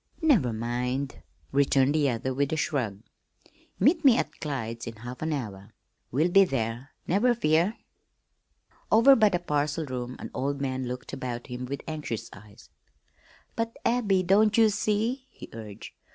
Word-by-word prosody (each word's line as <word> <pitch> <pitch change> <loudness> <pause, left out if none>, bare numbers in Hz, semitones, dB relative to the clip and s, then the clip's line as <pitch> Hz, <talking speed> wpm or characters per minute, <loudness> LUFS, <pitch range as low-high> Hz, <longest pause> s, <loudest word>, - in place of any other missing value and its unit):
"Never 230 - +4
mind," 125 +4 -3 0.3
returned 135 0 +3
the 150 -3 +2
other 125 +2 -2
with 140 +1 0
a 160 - 0
shrug. 115 -10 -2 0.8
"Meet 325 0 +3
me 260 -4 +7
at - - -3
Clyde's 115 -6 -4
in 115 - -6
half 120 +3 -9
an 160 +1 -1
hour. 110 -7 -5 0.3
We'll 155 +8 +1
be 195 +2 +7
there, 120 -4 -3
never 240 +7 +2
fear." 170 +2 +2 1.1
Over 245 +5 +7
by 215 -3 +5
the 180 - +1
parcel 150 -2 -1
room 125 -2 -5
an - - -8
old 140 +1 -2
man 130 -2 -2
looked 125 0 -6
about 120 -2 -4
him 125 -1 -6
with 140 +2 -5
anxious 150 -8 -5
eyes. 105 0 -16 0.8
"But, 230 0 -3
Abby, 210 -6 +2
don't 205 +4 +4
ye 225 -1 +6
see?" 215 +6 -1
he - - -12
urged. 110 -3 -9
140 Hz, 155 wpm, -27 LUFS, 125-195 Hz, 1.1 s, me